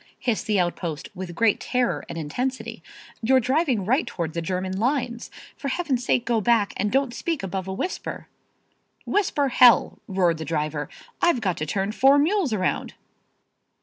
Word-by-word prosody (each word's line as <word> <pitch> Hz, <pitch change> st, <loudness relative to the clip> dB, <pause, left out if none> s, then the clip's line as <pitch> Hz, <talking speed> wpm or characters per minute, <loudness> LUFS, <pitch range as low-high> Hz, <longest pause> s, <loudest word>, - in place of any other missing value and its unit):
hissed 235 Hz, -4 st, -1 dB
the 210 Hz, -3 st, +2 dB
outpost 170 Hz, -2 st, -2 dB
with 180 Hz, -2 st, -6 dB
great 225 Hz, +1 st, +3 dB
terror 250 Hz, -1 st, 0 dB
and -, -, -6 dB
intensity. 250 Hz, -, -3 dB, 0.4 s
"You're 260 Hz, +3 st, +4 dB
driving 255 Hz, -, +1 dB
right 260 Hz, -, +1 dB
toward 165 Hz, -3 st, -4 dB
the 170 Hz, -, -2 dB
German 185 Hz, +2 st, -2 dB
lines. 245 Hz, -1 st, -1 dB, 0.3 s
For 280 Hz, -, -6 dB
Heaven's 270 Hz, -4 st, -1 dB
sake 245 Hz, 0 st, +1 dB
go 235 Hz, -2 st, +1 dB
back 225 Hz, -2 st, +2 dB
and 205 Hz, +1 st, -1 dB
don't 270 Hz, -2 st, +1 dB
speak 295 Hz, -, -3 dB
above 190 Hz, 0 st, -3 dB
a 190 Hz, -, -3 dB
whisper." 360 Hz, -, -4 dB, 0.8 s
"Whisper, 300 Hz, -9 st, +1 dB
Hell!" 245 Hz, -2 st, +5 dB
roared 180 Hz, -4 st, +1 dB
the -, -, -3 dB
driver. 150 Hz, -1 st, -2 dB, 0.3 s
"I've 345 Hz, -7 st, +3 dB
got 190 Hz, -6 st, 0 dB
to 155 Hz, -, -3 dB
turn 195 Hz, +4 st, -1 dB
four 270 Hz, +5 st, +5 dB
mules 325 Hz, -, +2 dB
around." 185 Hz, -4 st, -1 dB
225 Hz, 165 wpm, -24 LUFS, 185-260 Hz, 0.8 s, Hell